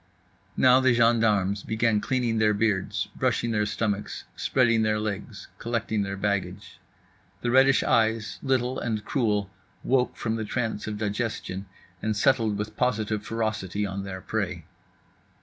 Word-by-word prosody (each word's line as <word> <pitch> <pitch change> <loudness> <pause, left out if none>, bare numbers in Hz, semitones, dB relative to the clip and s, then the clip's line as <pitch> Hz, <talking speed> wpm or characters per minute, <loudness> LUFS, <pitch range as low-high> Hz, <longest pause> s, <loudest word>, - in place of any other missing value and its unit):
Now 130 0 +6
the 130 -2 +3
gendarmes 110 -4 +3
began 110 -1 +1
cleaning 120 -3 0
their 105 -1 +3
beards, 100 -3 0
brushing 115 - 0
their 105 -1 +1
stomachs, 105 -1 -2
spreading 115 -3 +2
their 110 -1 +1
legs, 105 -2 -5
collecting 115 -2 -1
their 100 0 -3
baggage. 100 -1 -3 0.6
The 120 - 0
reddish 135 +1 +5
eyes, 110 -1 +1
little 130 -1 0
and 110 -3 -3
cruel, 105 -7 0 0.3
woke 125 -1 +1
from 110 -1 -2
the 110 - -2
trance 110 -1 -3
of 105 -1 -3
digestion 105 -2 -3 0.3
and 110 -1 -1
settled 110 -3 +2
with 105 +1 -5
positive 110 -4 0
ferocity 105 -3 -2
on 100 0 -4
their 95 -1 -6
prey. 90 -7 -3
110 Hz, 140 wpm, -26 LUFS, 105-115 Hz, 0.6 s, Now